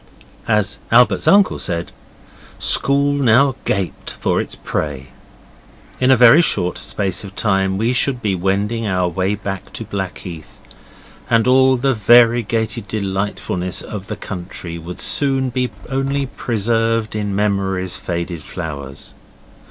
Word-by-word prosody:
As 105 Hz, -2 st, +1 dB
Albert's 125 Hz, +1 st, +4 dB
uncle 200 Hz, -1 st, +4 dB
said, 85 Hz, -1 st, -2 dB, 0.7 s
'School 140 Hz, +1 st, +3 dB
now 135 Hz, 0 st, +3 dB
gaped 95 Hz, -3 st, -3 dB
for -, -, +1 dB
its -, -, -7 dB
prey'. 70 Hz, -3 st, -4 dB, 0.9 s
In 130 Hz, -, +2 dB
a 130 Hz, -, +6 dB
very 125 Hz, +7 st, +7 dB
short 90 Hz, -, +1 dB
space 95 Hz, -2 st, -2 dB
of 95 Hz, -1 st, -10 dB
time 95 Hz, -3 st, 0 dB
we 115 Hz, +4 st, +1 dB
should 125 Hz, 0 st, +1 dB
be 105 Hz, -4 st, -1 dB
wending 100 Hz, +5 st, -1 dB
our 90 Hz, -2 st, 0 dB
way 95 Hz, +4 st, -1 dB
back 95 Hz, -2 st, -6 dB
to 115 Hz, -, -5 dB
Blackheath, 95 Hz, -5 st, -7 dB, 0.7 s
and 115 Hz, -1 st, +3 dB
all 130 Hz, 0 st, +4 dB
the 135 Hz, +2 st, +1 dB
variegated 115 Hz, 0 st, +3 dB
delightfulness 95 Hz, -3 st, -3 dB
of 100 Hz, -2 st, -7 dB
the -, -, -4 dB
country 85 Hz, -2 st, -7 dB
would 85 Hz, +2 st, -8 dB
soon 135 Hz, -2 st, +2 dB
be 125 Hz, 0 st, -1 dB, 0.2 s
only 135 Hz, +1 st, -1 dB
preserved 115 Hz, -3 st, -1 dB
in 105 Hz, -2 st, -2 dB
memory's 95 Hz, -3 st, -1 dB
faded 85 Hz, -1 st, -4 dB
flowers. 70 Hz, -5 st, -7 dB
105 Hz, 130 wpm, -18 LUFS, 95-120 Hz, 0.9 s, very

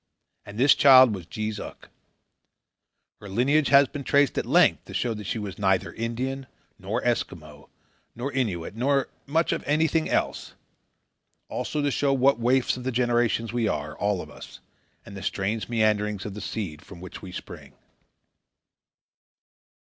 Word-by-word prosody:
And 100 Hz, +1 st, -9 dB
this 135 Hz, +4 st, +6 dB
child 130 Hz, -5 st, +7 dB
was 90 Hz, -5 st, -7 dB
Jees 110 Hz, +2 st, -4 dB
Uck. -, -, -10 dB, 1.3 s
Her 105 Hz, -, -10 dB
lineage 135 Hz, +8 st, +2 dB
has 140 Hz, 0 st, +6 dB
been 140 Hz, +2 st, -7 dB
traced 140 Hz, -1 st, +2 dB
at -, -, -2 dB
length -, -, +4 dB
to -, -, -10 dB
show 120 Hz, -2 st, 0 dB
that 105 Hz, -1 st, -8 dB
she 95 Hz, -, -2 dB
was 100 Hz, -3 st, -6 dB
neither 95 Hz, -2 st, +1 dB
Indian, 130 Hz, +4 st, -4 dB, 0.3 s
nor -, -, -3 dB
Eskimo, 75 Hz, -3 st, -3 dB, 0.5 s
nor 125 Hz, +4 st, -4 dB
Innuit, 105 Hz, -12 st, -2 dB
nor 135 Hz, +4 st, 0 dB, 0.2 s
much 160 Hz, +4 st, +1 dB
of -, -, -2 dB
anything 155 Hz, +2 st, +1 dB
else; -, -, -2 dB, 0.9 s
also 150 Hz, -, -3 dB
to 145 Hz, -, +1 dB
show 140 Hz, +1 st, +1 dB
what 135 Hz, 0 st, +3 dB
waifs 125 Hz, +2 st, +2 dB
of 125 Hz, -, -8 dB
the 130 Hz, -, -2 dB
generations 120 Hz, -2 st, 0 dB
we 120 Hz, -2 st, 0 dB
are, 75 Hz, -2 st, -3 dB
all 100 Hz, -3 st, -1 dB
of -, -, -13 dB
us, -, -, -12 dB, 0.5 s
and 100 Hz, -, -11 dB
the 100 Hz, -, -7 dB
strange 100 Hz, +2 st, -2 dB
meanderings 105 Hz, -3 st, 0 dB
of 105 Hz, -, -5 dB
the 105 Hz, -, -7 dB
seed 80 Hz, -9 st, -5 dB
from 90 Hz, -1 st, -13 dB
which 90 Hz, +1 st, -10 dB
we 95 Hz, -, -9 dB
spring. -, -, -10 dB
115 Hz, 160 wpm, -25 LUFS, 100-135 Hz, 1.3 s, child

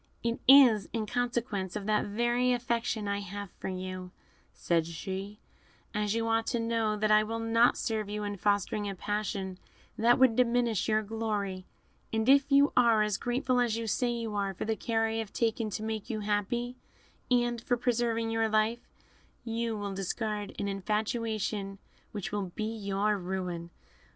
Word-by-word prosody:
"It 235 Hz, 0 st, -1 dB
is 255 Hz, -6 st, +7 dB
in 225 Hz, -2 st, -1 dB
consequence 235 Hz, -5 st, -2 dB
of 205 Hz, -2 st, -4 dB
that 215 Hz, 0 st, +2 dB
very 240 Hz, +4 st, +1 dB
affection 235 Hz, -3 st, -1 dB
I 200 Hz, 0 st, -1 dB
have 200 Hz, -1 st, -7 dB
for -, -, -5 dB
you," 185 Hz, -1 st, -5 dB, 0.4 s
said 165 Hz, -2 st, 0 dB
she, 190 Hz, +5 st, -5 dB, 0.6 s
"as 210 Hz, 0 st, 0 dB
you 230 Hz, 0 st, 0 dB
ought 225 Hz, 0 st, +1 dB
to 235 Hz, -, 0 dB
know, 230 Hz, -2 st, 0 dB
that 215 Hz, 0 st, +1 dB
I 215 Hz, 0 st, +7 dB
will 225 Hz, +2 st, -3 dB
not 230 Hz, +1 st, +3 dB
serve 215 Hz, -2 st, -2 dB
you 210 Hz, 0 st, -3 dB
in 205 Hz, 0 st, -3 dB
fostering 205 Hz, +1 st, 0 dB
a 195 Hz, -, -5 dB
passion 195 Hz, -1 st, -3 dB, 0.4 s
that 235 Hz, +2 st, +5 dB
would 260 Hz, -3 st, +5 dB
diminish 240 Hz, -4 st, +2 dB
your 215 Hz, 0 st, +2 dB
glory; 205 Hz, -3 st, -3 dB, 0.4 s
and 220 Hz, +1 st, 0 dB
if 275 Hz, +1 st, +5 dB
you 280 Hz, +1 st, +5 dB
are 230 Hz, -3 st, +5 dB
as 210 Hz, -2 st, 0 dB
grateful 250 Hz, +1 st, 0 dB
as 235 Hz, -2 st, +1 dB
you 230 Hz, -, -3 dB
say 240 Hz, +3 st, 0 dB
you 230 Hz, -2 st, -3 dB
are 200 Hz, -2 st, -1 dB
for -, -, -4 dB
the 220 Hz, 0 st, 0 dB
care 225 Hz, 0 st, 0 dB
I 225 Hz, 0 st, -1 dB
have 220 Hz, -2 st, -4 dB
taken 225 Hz, -1 st, 0 dB
to 210 Hz, +1 st, -4 dB
make 220 Hz, 0 st, -4 dB
you 215 Hz, -3 st, -2 dB
happy, 215 Hz, +4 st, -1 dB, 0.5 s
and 240 Hz, -2 st, +2 dB
for 245 Hz, 0 st, 0 dB
preserving 235 Hz, -2 st, 0 dB
your 225 Hz, 0 st, +1 dB
life, 220 Hz, +2 st, 0 dB, 0.5 s
you 230 Hz, -1 st, -2 dB
will 200 Hz, -1 st, -4 dB
discard 205 Hz, +2 st, -3 dB
an 200 Hz, -, -2 dB
infatuation 210 Hz, 0 st, -2 dB, 0.3 s
which 205 Hz, -1 st, -5 dB
will 200 Hz, -3 st, -3 dB
be 220 Hz, +1 st, -3 dB
your 205 Hz, 0 st, 0 dB
ruin. 180 Hz, -2 st, -4 dB
215 Hz, 175 wpm, -30 LUFS, 205-235 Hz, 0.6 s, is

